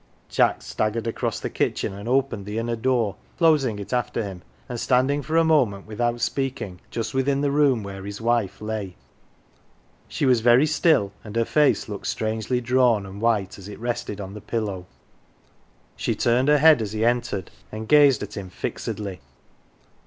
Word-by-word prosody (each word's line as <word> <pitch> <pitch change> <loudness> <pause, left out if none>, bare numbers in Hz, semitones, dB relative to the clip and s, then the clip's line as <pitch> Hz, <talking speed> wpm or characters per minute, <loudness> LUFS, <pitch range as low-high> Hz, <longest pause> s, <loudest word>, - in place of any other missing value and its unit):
Jack - - +2
staggered 110 +2 -2
across 115 - -2
the - - -3
kitchen - - -1
and 100 +4 -7
opened 130 -6 0
the 105 +1 -4
inner 115 +1 -1
door, 115 -3 0 0.2
closing 150 -10 +3
it 100 +4 -7
after 120 -2 -1
him, 95 -3 -7 0.3
and 120 -1 -5
standing 130 +4 +2
for 160 +3 -1
a 165 - +5
moment, 125 -12 +2
without 120 +2 -1
speaking, 120 -9 -2
just 115 - -4
within 135 +1 +1
the 145 -1 +1
room 140 -6 +3
where 95 -1 -7
his 100 +1 -6
wife 115 -4 0
lay. 105 -4 -4 1.1
She - - -2
was 125 -3 +4
very 120 +5 +5
still, 155 - +2
and 105 0 -9
her 115 0 +2
face 150 +3 +2
looked 105 -2 -6
strangely 110 +3 -1
drawn 120 -4 +2
and 95 +2 -9
white 105 -4 0
as 95 - -10
it 105 - -9
rested 120 -3 -3
on 95 -1 -6
the 105 - -9
pillow. 105 -4 -3 1.1
She - - -1
turned 120 +3 +2
her 150 0 +5
head 155 -3 +6
as 105 -1 -4
he 110 +1 0
entered, 120 -6 -1 0.2
and 110 +1 -6
gazed 145 -5 +5
at - - -8
him 100 -3 -6
fixedly. 95 0 -5
115 Hz, 175 wpm, -24 LUFS, 105-130 Hz, 1.1 s, head